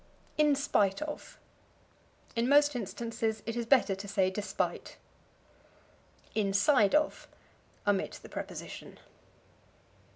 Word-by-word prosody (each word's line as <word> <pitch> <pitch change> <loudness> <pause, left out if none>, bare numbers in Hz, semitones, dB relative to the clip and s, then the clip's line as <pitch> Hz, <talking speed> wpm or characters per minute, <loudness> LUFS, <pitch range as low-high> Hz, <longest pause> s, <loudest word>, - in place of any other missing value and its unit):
In 300 -1 +4
Spite 210 -6 +1
of. 300 -1 -7 1.0
In 235 +2 +1
most 290 0 +5
instances 225 0 -3
it 230 - -3
is 235 -1 -2
better 250 -6 +4
to 195 +1 -7
say 195 -2 +1
despite. 205 +2 -3 1.4
Inside 205 +2 +3
of. 305 0 +1 0.6
Omit 205 -2 0
the - - -9
preposition. - - -7
230 Hz, 100 wpm, -31 LUFS, 200-280 Hz, 1.4 s, most